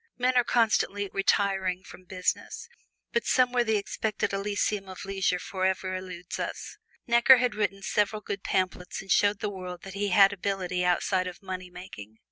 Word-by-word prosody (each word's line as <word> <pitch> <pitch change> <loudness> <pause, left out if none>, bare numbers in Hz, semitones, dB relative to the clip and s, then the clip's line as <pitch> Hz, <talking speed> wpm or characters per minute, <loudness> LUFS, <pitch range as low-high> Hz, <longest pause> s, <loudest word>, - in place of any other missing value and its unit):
Men 255 +1 +1
are 245 - +5
constantly 205 -4 +1
"retiring" 195 -2 +1
from 185 - -13
business, 185 - -3 0.5
but 470 - +1
someway 250 -1 +3
the 220 -2 +1
expected 210 0 -2
Elysium 200 0 -1
of 185 - -8
leisure 195 -2 0
forever 185 0 -2
eludes 180 -1 -7
us. - - -5 0.3
Necker 240 +2 +7
had 250 -1 +1
written 205 -2 -2
several 210 +1 0
good 200 - -4
pamphlets 185 -2 -2
and 195 - -7
showed 205 0 +3
the 210 - -2
world 180 -2 -7
that 195 - -8
he 205 +1 -1
had 195 +1 +6
ability 185 -2 -2
outside 185 +1 +1
of 180 +2 -9
money 185 -1 -6
making. 110 - -11
195 Hz, 165 wpm, -27 LUFS, 185-210 Hz, 0.5 s, Necker